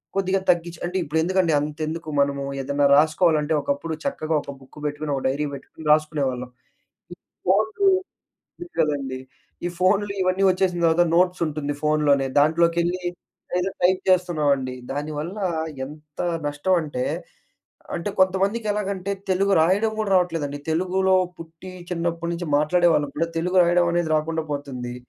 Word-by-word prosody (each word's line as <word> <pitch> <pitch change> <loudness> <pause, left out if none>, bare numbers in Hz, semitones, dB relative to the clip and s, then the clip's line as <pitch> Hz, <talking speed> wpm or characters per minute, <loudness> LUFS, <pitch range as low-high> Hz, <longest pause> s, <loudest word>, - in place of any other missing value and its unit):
కొద్దిగా 195 0 +1
తగ్గించి 170 -1 +1
అంటే 180 +2 -2
ఇప్పుడు 160 +1 -1
ఎందుకండి 185 -1 +2
అంతెందుకు 155 +2 -4
మనము 140 0 0 0.2
ఏదన్నా 140 +1 0
రాసుకోవాలంటే, 155 0 +3
ఒకప్పుడు 145 +3 -2
చక్కగా 160 - -1
ఒక - - -8
బుక్ 135 +3 -15
పెట్టుకొని, 145 0 -2
ఒక - - -5
డైరీ 145 +3 -1
పెట్టుకొని 150 +3 -10
రాసుకునేవాళ్ళం. 140 -5 -1 0.6
ఈ - - -11 0.3
ఫోన్లు 220 - +2 0.8
ఉ - - -12
కదండీ. 135 -4 -1 0.5
ఈ - - 0
ఫోన్లు 200 +2 +2
ఇవన్నీ 185 +1 +1
వచ్చేసిన 185 -1 +1
తర్వాత 165 +1 +4
నోట్స్ 180 +1 +3
ఉంటుంది 145 -1 -3
ఫోన్‌లోనే, 150 -3 +2
దాంట్లోకెళ్ళి 170 +4 +2 0.6
ఏదో 190 +2 0
టైప్ 185 +1 +3
చేస్తున్నామండి. 150 -8 +1 0.2
దానివల్ల 150 +6 -4 0.5
ఎంత 150 +1 -11 0.3
నష్టం 145 +6 0
అంటే, 130 -5 -3 0.9
అంటే 170 +4 -3
కొంతమందికి 195 +4 +2
ఎలాగంటే 200 -2 -2 0.2
తెలుగు 195 +2 +2
రాయడం 200 +7 +2
కూడా 210 -2 -1
రావట్లేదండి. 160 -5 -1
తెలుగులో 185 +3 +2 0.2
పుట్టి, 165 +3 -10 0.2
చిన్నప్పటి 170 -1 -2
నుంచి 170 -2 -5
మాట్లాడేవాళ్ళం 155 -2 +2
కూడా 165 - +1
తెలుగు 180 +3 +1
రాయడం 175 0 +3
అనేది 170 -2 0
రాకుండా 160 +1 -1
పోతుంది. 130 -4 -5
165 Hz, 135 wpm, -23 LUFS, 150-185 Hz, 0.9 s, తర్వాత